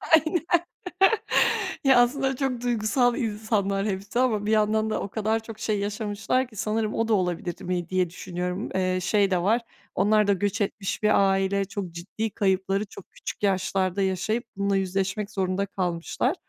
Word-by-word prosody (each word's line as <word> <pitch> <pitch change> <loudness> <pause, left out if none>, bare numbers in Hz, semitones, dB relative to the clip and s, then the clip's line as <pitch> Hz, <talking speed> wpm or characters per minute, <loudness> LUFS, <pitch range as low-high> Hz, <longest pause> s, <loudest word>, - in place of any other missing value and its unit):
Aynen. 320 +2 +1 1.4
Ya, 265 -2 +7
aslında 265 +1 +1
çok 255 -3 -2
duygusal 240 +1 +2
insanlar 210 -4 -1
hepsi 200 +4 -2
ama 220 -5 +1
bir 215 - 0
yandan 215 0 +2
da - - -1
o 200 - -4
kadar 220 +1 0
çok 225 -1 -9
şey 215 -2 0
yaşamışlar 210 +4 -1
ki, 225 - -18
sanırım 215 +1 -1
o 225 0 0
da 225 - +2
olabilirdi 180 -2 -1
mi 175 -1 -2
diye 185 -2 +1
düşünüyorum. 180 +2 -4
Eee, 185 -1 +1
şey 200 +1 +2
de 180 - +2
var; 225 +6 +2 0.3
onlar 210 +2 +3
da 200 - +5
göç 205 +2 -1
etmiş 200 +1 -2
bir 200 -2 +4
aile, 195 +1 +1
çok 195 -3 -5
ciddi 195 +6 -4
kayıpları 195 +1 0
çok 200 -1 -13
küçük - - -7
yaşlarda 190 0 +1
yaşayıp 195 +5 0
bununla 200 0 +1
yüzleşmek 195 +2 -1
zorunda 190 0 0
kalmışlar. 185 - -1
205 Hz, 165 wpm, -26 LUFS, 190-220 Hz, 1.4 s, Ya